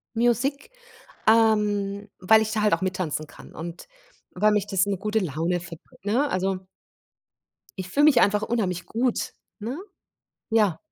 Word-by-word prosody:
Music, 245 - +1 0.6
ähm 210 -2 +2
weil 220 +4 +5
ich 220 0 -1
da 220 -1 0
halt 210 0 +3
auch - - +1
mittanzen 180 -5 -2
kann - - -14
und 170 +2 -8 0.5
weil 215 0 +3
mich 210 -1 +1
das 195 -1 +2
in 200 - -2
'ne - - -3
gute 210 +3 0
Laune 170 0 -1
verbr 170 -1 -12
ne? 245 +9 +1
Also 190 -1 -1 1.2
Ich 185 - -6
fühle 285 +10 +2
mich 295 -5 +6
einfach 205 +1 +3
unheimlich 195 -6 -1
gut, 240 +1 -1 0.3
ne? 245 +9 -4 0.7
Ja. 210 -7 +3
205 Hz, 155 wpm, -25 LUFS, 185-225 Hz, 1.2 s, mich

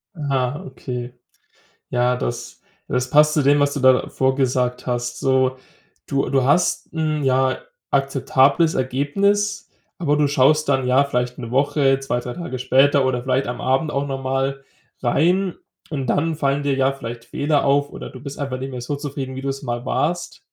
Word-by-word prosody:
Ah, 140 -3 -1
okay. 125 -2 -6 0.8
Ja, 125 0 +2
das 120 - -5 0.3
das 125 0 -1
passt 150 +2 +5
zu 150 - +2
dem, 145 +1 +4
was 145 0 +2
du 140 - -3
davor 130 0 +3
gesagt 125 -2 0
hast. 120 0 -2
So, 130 -1 +2 0.5
du 140 -1 0
du 135 -2 +2
hast 155 +7 +1
'n, 155 -2 -1
ja, 130 0 +2 0.3
akzeptables 140 +3 +2
Ergebnis, 195 +11 0 0.3
aber 150 -5 +1
du 150 0 +3
schaust 145 +2 +3
dann, 135 -2 +2
ja, 130 +2 +4
vielleicht 125 -3 -2
'ne 120 -3 -6
Woche, 135 +1 +2
2, 135 -3 -2
3 125 0 -6
Tage 170 -7 -5
später 135 +2 +3
oder 125 -2 -1
vielleicht 130 +1 0
am 120 0 -4
Abend 135 +4 +1
auch 140 0 -1
nochmal 135 0 -2 0.4
rein 175 +9 +2 0.4
und 135 -4 -3
dann 160 +5 +1
fallen 140 -1 0
dir 140 -1 +1
ja 135 0 +2
vielleicht 120 -3 -8
Fehler 145 +4 0
auf, 140 +1 +2
oder - - -8
du 130 - -11
bist 140 +1 -8
einfach 135 -3 -3
nicht 135 +1 -5
mehr 125 -1 -6
so 135 +4 -3
zufrieden, 140 -2 -5
wie 135 - -6
du's 135 +1 -3
mal 120 -1 -4
warst. 170 +3 -1
135 Hz, 175 wpm, -21 LUFS, 130-145 Hz, 0.8 s, passt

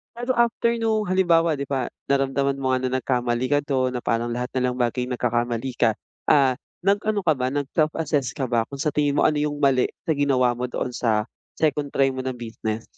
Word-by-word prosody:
Pero 245 +2 -1
after 235 0 +2
nung 220 -2 0
halimbawa, 170 -3 +3
'di 140 - -3
ba 130 -3 -1 0.2
naramdaman 140 0 +1
mo 130 -1 0
nga - - 0
na 130 0 0
nagkamali 125 -1 0
ka 145 - +4
do'n, 130 -3 0
na 125 - -2
parang 115 +1 0
lahat 125 +2 -3
na 130 - -1
lang 125 - -2
ng 125 - -2
bagay 125 +1 -1
nagkakamali 120 0 -1
ka, 115 -2 +3 0.3
ah, 135 -3 +4 0.2
nag-ano 205 +1 +1
ka 160 - +3
ba, 130 -3 -2
nag-self 145 +3 0
assess 145 -5 -1
ka 135 - -3
ba 120 -2 0
kung 140 - -9
sa 150 - +1
tingin 145 -1 +1
mo - - +3
ano 150 -1 +3
yung 150 0 -1
mali 130 -2 +4 0.2
sa 170 - -1
ginawa 130 -3 +3
mo 125 - -2
doon 125 - -3
sa 110 -3 +1 0.3
second 150 -2 0
try 135 -1 +3
mo 130 - -6
na 130 - -1
business? 110 -2 -4
135 Hz, 215 wpm, -24 LUFS, 125-150 Hz, 0.3 s, ka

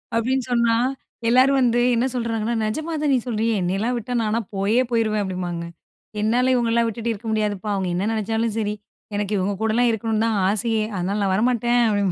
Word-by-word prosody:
அப்படின்னு 255 +3 +1
சொன்னா. 235 -1 +3 0.5
எல்லோரும் 260 +3 +5
வந்து 240 -1 +3
என்ன 235 +2 +1
சொல்றாங்கன்னா, 230 -1 -1
"நிஜமா 310 +10 -3
தான் 295 -2 +1
நீ - - +4
சொல்றியா, 225 0 0
என்னையெல்லாம் 195 +7 0
விட்டா 240 +2 -5
நான்லாம் 220 -1 -1
போயே 210 +6 +2
போயிருவேன்." 215 -3 +1
அப்படிம்பாங்க 180 -3 -4 0.6
என்னால 245 +4 +2
இவங்களலாம் 235 -1 +2
விட்டுட்டு 230 +1 -2
இருக்க 225 +1 -6
முடியாதுப்பா 210 -1 -1
அவங்க 190 -2 -1
என்ன 190 +4 -1
நினைச்சாலும் 225 +1 -1
சரி, 210 -2 -1 0.4
எனக்கு 205 0 -2
இவங்க 195 +2 0
கூடலாம் 225 +2 +2
இருக்கணும்னு 220 0 0
தான் 220 -3 +1
ஆசையே! 220 +1 +1
அதனால 190 +3 -1
நான் 190 -1 +1
வரமாட்டேன் 240 +2 +2
அப்டிம்பேங்க. 205 -3 +1
225 Hz, 175 wpm, -22 LUFS, 205-235 Hz, 0.6 s, எல்லோரும்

